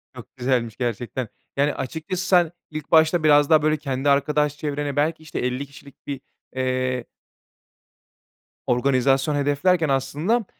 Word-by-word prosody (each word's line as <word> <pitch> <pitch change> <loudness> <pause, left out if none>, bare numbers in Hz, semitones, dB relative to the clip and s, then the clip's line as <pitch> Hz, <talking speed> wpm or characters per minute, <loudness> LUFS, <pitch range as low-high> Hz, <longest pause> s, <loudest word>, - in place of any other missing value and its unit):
Çok 120 +2 -12
güzelmiş, 125 -3 -1
gerçekten. 120 0 -3 0.3
Yani, 145 +1 +2
açıkçası 160 +7 -4
sen 175 -3 +4 0.2
ilk 155 -1 -7
başta 160 +1 +4
biraz 145 -1 +5
daha, 155 -1 +6
böyle, 155 0 +2
kendi 140 -1 -1
arkadaş 150 +1 +2
çevrene 145 -1 -3
belki, 155 +2 0
işte, 155 - -5
50 125 +3 -2
kişilik 140 0 -17
bir, 140 -2 -4 0.3
eee 130 -1 -1 1.6
organizasyon 135 +3 +2
hedeflerken 145 +3 +2
aslında, 150 - 0
145 Hz, 130 wpm, -23 LUFS, 130-155 Hz, 1.6 s, daha